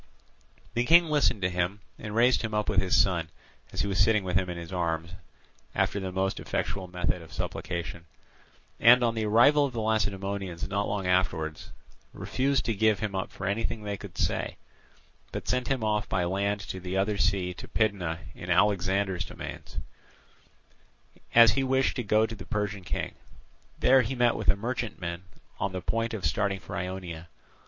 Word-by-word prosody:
The 120 Hz, +1 st, +1 dB
King 165 Hz, +3 st, +6 dB
listened 145 Hz, -9 st, +2 dB
to 90 Hz, -, +3 dB
him 90 Hz, +3 st, -1 dB, 0.2 s
and 105 Hz, -1 st, -6 dB
raised 120 Hz, +2 st, +4 dB
him 110 Hz, -2 st, -3 dB
up 105 Hz, 0 st, 0 dB
with 100 Hz, -4 st, +3 dB
his 95 Hz, -, +3 dB
son, 85 Hz, -5 st, +2 dB, 0.4 s
as -, -, -2 dB
he -, -, 0 dB
was 95 Hz, -2 st, -1 dB
sitting 105 Hz, +1 st, +4 dB
with 90 Hz, -2 st, -3 dB
him 90 Hz, +2 st, +2 dB
in 90 Hz, -, -4 dB
his 85 Hz, +2 st, -7 dB
arms 85 Hz, -1 st, -1 dB, 0.6 s
after 100 Hz, -, +1 dB
the 95 Hz, -1 st, -4 dB
most 95 Hz, +1 st, -1 dB
effectual 95 Hz, -2 st, -3 dB
method 90 Hz, -1 st, -2 dB
of 80 Hz, -, -13 dB
supplication, 85 Hz, 0 st, -4 dB, 0.7 s
and 125 Hz, +2 st, +7 dB
on 115 Hz, -1 st, +2 dB
the 110 Hz, -1 st, -1 dB
arrival 130 Hz, +8 st, +6 dB
of 140 Hz, -3 st, -1 dB
the 115 Hz, -, -3 dB
Lacedaemonians 100 Hz, -5 st, -1 dB
not 100 Hz, +1 st, -1 dB
long 100 Hz, -2 st, -2 dB
afterwards, 85 Hz, -4 st, 0 dB, 0.4 s
refused 135 Hz, +1 st, 0 dB
to 115 Hz, -, +1 dB
give 110 Hz, 0 st, +3 dB
him 105 Hz, -1 st, -3 dB
up 95 Hz, 0 st, -3 dB
for 95 Hz, -, -7 dB
anything 105 Hz, +2 st, -1 dB
they 100 Hz, -1 st, -3 dB
could 95 Hz, -3 st, -10 dB
say, -, -, -1 dB, 0.7 s
but -, -, -5 dB
sent 125 Hz, 0 st, 0 dB
him 130 Hz, -4 st, 0 dB
off 105 Hz, -1 st, 0 dB
by 90 Hz, -, +1 dB
land 100 Hz, +3 st, 0 dB
to 95 Hz, 0 st, -6 dB
the 90 Hz, +1 st, -3 dB
other 100 Hz, +1 st, 0 dB
sea 90 Hz, 0 st, +1 dB
to -, -, -10 dB
Pydna 95 Hz, -7 st, 0 dB
in 85 Hz, -, -9 dB
Alexander's 95 Hz, 0 st, +2 dB
dominions, -, -, -8 dB, 1.6 s
as 115 Hz, -2 st, +9 dB
he 135 Hz, +7 st, 0 dB
wished 130 Hz, 0 st, +2 dB
to -, -, 0 dB
go 110 Hz, +1 st, +3 dB
to 115 Hz, -, -6 dB
the 100 Hz, -3 st, -10 dB
Persian 105 Hz, -2 st, -2 dB
king. -, -, -3 dB, 0.6 s
There 130 Hz, 0 st, +5 dB
he 125 Hz, +3 st, -3 dB
met 120 Hz, -1 st, +3 dB
with -, -, 0 dB
a -, -, +6 dB
merchantman 100 Hz, -6 st, -4 dB, 0.3 s
on 95 Hz, -1 st, -1 dB
the 95 Hz, -, -2 dB
point 115 Hz, +3 st, -1 dB
of 95 Hz, -6 st, -4 dB
starting 100 Hz, +4 st, 0 dB
for -, -, -8 dB
Ionia. 90 Hz, -2 st, -5 dB
100 Hz, 185 wpm, -28 LUFS, 90-110 Hz, 1.6 s, as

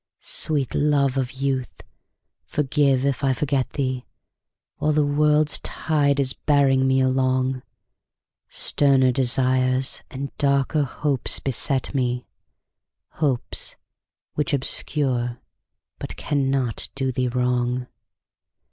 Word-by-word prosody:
Sweet 145 Hz, -5 st, -1 dB
love 140 Hz, -3 st, +2 dB
of 130 Hz, -2 st, -1 dB
youth, 130 Hz, -1 st, -3 dB, 0.6 s
forgive 140 Hz, -2 st, +1 dB
if 140 Hz, 0 st, -1 dB
I 135 Hz, -1 st, +3 dB
forget 135 Hz, -1 st, -1 dB
thee 130 Hz, -3 st, -2 dB, 0.7 s
While 155 Hz, -, +1 dB
the 150 Hz, -1 st, +2 dB
world's 150 Hz, +1 st, +2 dB
tide 145 Hz, -3 st, 0 dB
is 135 Hz, -1 st, +2 dB
bearing 135 Hz, -3 st, +2 dB
me 130 Hz, 0 st, +3 dB
along; 130 Hz, 0 st, +1 dB, 0.9 s
Sterner 135 Hz, -3 st, +3 dB
desires 130 Hz, +1 st, +2 dB
and 140 Hz, +1 st, -6 dB
darker 140 Hz, +1 st, +2 dB
hopes 140 Hz, -1 st, 0 dB
beset 135 Hz, +1 st, -1 dB
me, 125 Hz, -2 st, -1 dB, 1.0 s
Hopes 135 Hz, -6 st, +1 dB, 0.6 s
which 150 Hz, +2 st, -2 dB
obscure 130 Hz, -3 st, 0 dB, 0.6 s
but -, -, -6 dB
cannot 135 Hz, -5 st, -1 dB
do 135 Hz, -1 st, -1 dB
thee 125 Hz, 0 st, -1 dB
wrong. 125 Hz, 0 st, 0 dB
135 Hz, 105 wpm, -23 LUFS, 130-140 Hz, 1.0 s, I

